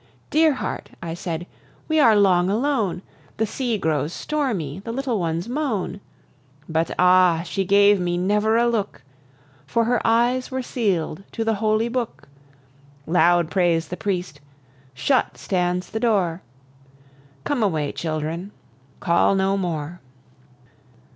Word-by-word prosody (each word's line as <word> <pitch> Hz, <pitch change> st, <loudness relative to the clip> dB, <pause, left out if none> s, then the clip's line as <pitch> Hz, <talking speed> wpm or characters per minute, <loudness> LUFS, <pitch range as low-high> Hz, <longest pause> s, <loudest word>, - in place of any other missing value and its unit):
Dear 315 Hz, -1 st, +4 dB
heart," -, -, -5 dB
I 165 Hz, -1 st, -5 dB
said, 170 Hz, 0 st, -4 dB, 0.4 s
"we 315 Hz, 0 st, +2 dB
are 230 Hz, -7 st, +6 dB
long 185 Hz, -3 st, +4 dB
alone; 220 Hz, -5 st, 0 dB, 0.3 s
The 220 Hz, -, +1 dB
sea 240 Hz, +1 st, -2 dB
grows 155 Hz, -3 st, -1 dB
stormy, 215 Hz, -, -2 dB
the 230 Hz, -, -5 dB
little 250 Hz, -3 st, -2 dB
ones 170 Hz, +2 st, -2 dB
moan." 230 Hz, -, -2 dB, 0.7 s
But, 160 Hz, +1 st, 0 dB
ah, 180 Hz, -2 st, +4 dB
she 195 Hz, +2 st, -2 dB
gave 200 Hz, +1 st, +5 dB
me 175 Hz, -1 st, -1 dB
never 210 Hz, +4 st, +2 dB
a 235 Hz, -, +3 dB
look, 220 Hz, -4 st, -2 dB, 0.6 s
For 230 Hz, +11 st, +1 dB
her 240 Hz, +1 st, +1 dB
eyes 240 Hz, +3 st, +2 dB
were 260 Hz, -1 st, -3 dB
seal'd 195 Hz, -9 st, -1 dB
to 225 Hz, -, -2 dB
the 225 Hz, -, +2 dB
holy 215 Hz, +1 st, +2 dB
book! 240 Hz, -1 st, -4 dB, 0.8 s
Loud 175 Hz, -1 st, +3 dB
prays 175 Hz, -3 st, +1 dB
the 180 Hz, -, -4 dB
priest: 180 Hz, -7 st, -3 dB, 0.5 s
shut 260 Hz, -, +1 dB
stands 180 Hz, -1 st, -1 dB
the 220 Hz, -, -2 dB
door. 190 Hz, -7 st, +1 dB, 1.0 s
Come 285 Hz, -5 st, -1 dB
away, 155 Hz, -8 st, 0 dB
children, 160 Hz, +4 st, -4 dB, 0.5 s
call 170 Hz, +3 st, +3 dB
no 195 Hz, 0 st, +1 dB
more! 170 Hz, -3 st, -3 dB
195 Hz, 135 wpm, -22 LUFS, 175-230 Hz, 1.0 s, are